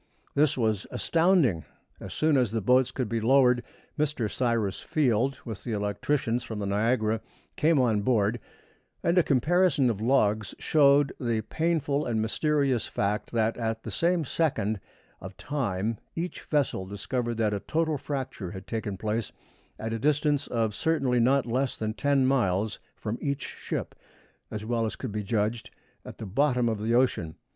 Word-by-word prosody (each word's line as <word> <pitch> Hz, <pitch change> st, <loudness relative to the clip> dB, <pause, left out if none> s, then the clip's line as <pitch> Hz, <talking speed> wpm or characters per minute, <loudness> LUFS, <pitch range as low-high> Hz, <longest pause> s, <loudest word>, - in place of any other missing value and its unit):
This 150 Hz, 0 st, +2 dB
was 110 Hz, -4 st, 0 dB
astounding. 165 Hz, -, +2 dB, 0.4 s
As 95 Hz, -, -8 dB
soon 155 Hz, -, +2 dB
as 125 Hz, -4 st, +3 dB
the 115 Hz, +2 st, -1 dB
boats 125 Hz, +4 st, +3 dB
could 130 Hz, -2 st, -3 dB
be 115 Hz, +1 st, -2 dB
lowered, 125 Hz, 0 st, +4 dB, 0.4 s
Mr. 150 Hz, -7 st, 0 dB
Cyrus 115 Hz, -6 st, 0 dB
Field, 130 Hz, -2 st, +1 dB
with 110 Hz, -5 st, -7 dB
the 120 Hz, -, -3 dB
electricians 115 Hz, +4 st, -1 dB
from 110 Hz, -, -6 dB
the 105 Hz, -, -3 dB
Niagara, 110 Hz, +2 st, +1 dB, 0.3 s
came 155 Hz, 0 st, +3 dB
on 115 Hz, -5 st, +2 dB
board, 110 Hz, 0 st, +1 dB, 0.6 s
and 170 Hz, -, +2 dB
a 180 Hz, -, +6 dB
comparison 150 Hz, -1 st, +3 dB
of 105 Hz, -2 st, -5 dB
logs 110 Hz, -4 st, +2 dB
showed 145 Hz, -2 st, +4 dB
the 115 Hz, -4 st, 0 dB
painful 150 Hz, +1 st, 0 dB
and 115 Hz, -2 st, 0 dB
mysterious 135 Hz, +2 st, +1 dB
fact 105 Hz, +1 st, -2 dB
that 115 Hz, -1 st, +1 dB
at 115 Hz, -1 st, -2 dB
the -, -, -6 dB
same 170 Hz, -1 st, +1 dB
second 110 Hz, -9 st, 0 dB, 0.4 s
of 95 Hz, 0 st, -9 dB
time 115 Hz, -6 st, -2 dB, 0.2 s
each 175 Hz, +2 st, -4 dB
vessel 140 Hz, -11 st, 0 dB
discovered 115 Hz, +4 st, -3 dB
that 110 Hz, -2 st, +1 dB
a 100 Hz, -, -1 dB
total 160 Hz, +4 st, -1 dB
fracture 130 Hz, -9 st, -4 dB
had 95 Hz, 0 st, -8 dB
taken 110 Hz, -3 st, -4 dB
place 110 Hz, +2 st, -2 dB, 0.5 s
at 110 Hz, +1 st, -4 dB
a 115 Hz, -, -2 dB
distance 145 Hz, +1 st, +1 dB
of 115 Hz, -3 st, 0 dB
certainly 135 Hz, -2 st, +1 dB
not 130 Hz, +2 st, +3 dB
less 130 Hz, +2 st, -1 dB
than 110 Hz, 0 st, -2 dB
ten 140 Hz, +1 st, +2 dB
miles 110 Hz, -6 st, +1 dB, 0.2 s
from 110 Hz, +2 st, -4 dB
each 140 Hz, -1 st, -2 dB
ship, -, -, -5 dB, 0.6 s
as 105 Hz, 0 st, -5 dB
well 115 Hz, 0 st, 0 dB
as -, -, -5 dB
could 130 Hz, -, -5 dB
be 105 Hz, +1 st, -2 dB
judged, 110 Hz, +2 st, -1 dB, 0.3 s
at -, -, -10 dB
the -, -, -6 dB
bottom 125 Hz, +3 st, +2 dB
of 110 Hz, -2 st, -1 dB
the 115 Hz, +2 st, +1 dB
ocean. 105 Hz, -11 st, +1 dB
120 Hz, 165 wpm, -27 LUFS, 110-140 Hz, 0.6 s, a